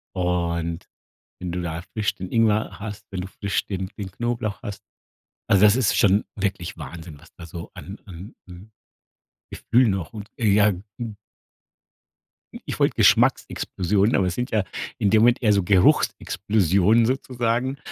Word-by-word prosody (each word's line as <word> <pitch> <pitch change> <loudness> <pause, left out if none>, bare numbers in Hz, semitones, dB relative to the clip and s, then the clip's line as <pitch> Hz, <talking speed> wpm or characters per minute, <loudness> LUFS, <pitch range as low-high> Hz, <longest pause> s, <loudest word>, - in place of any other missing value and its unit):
und 85 -1 -2 0.5
wenn 90 -1 -4
du 90 - -3
da 85 -1 -4
frisch 105 -2 -1
den 90 -1 -8
Ingwer 110 -2 +1
hast, 105 -1 -7
wenn 95 -3 -4
du 95 - -7
frisch 100 0 -3
den 95 -1 -4
den 95 -2 -5
Knoblauch 115 0 -3
hast, 100 -1 -7 0.7
also 100 +1 +4
das 105 +2 +6
ist 130 -5 +2
schon 100 +1 +4
wirklich 95 -4 -3
Wahnsinn, 80 -3 -9
was 80 +3 -19
da 85 - -11
so 85 0 -8
an 95 +3 -9
an 95 +2 -11
an 90 +5 -12 0.8
Gefühl 125 0 +2
noch 95 -2 -2
und 105 -1 -9
ey, 110 -4 +2
ja, 105 +1 +4 0.3
hm 115 -3 -5 1.4
hm, - - -9
ich - - -4
wollte - - +3
Geschmacksexplosionen, 100 +5 +2
aber 95 - +2
es 90 - -1
sind 125 +1 -3
ja 110 -3 +1 0.3
in 100 - +2
dem 110 +1 +5
Moment 120 +2 +4
eher 105 - +4
so 100 -2 +3
Geruchsexplosionen 100 +3 +3
sozusagen. 125 0 -1
100 Hz, 160 wpm, -23 LUFS, 90-110 Hz, 1.4 s, das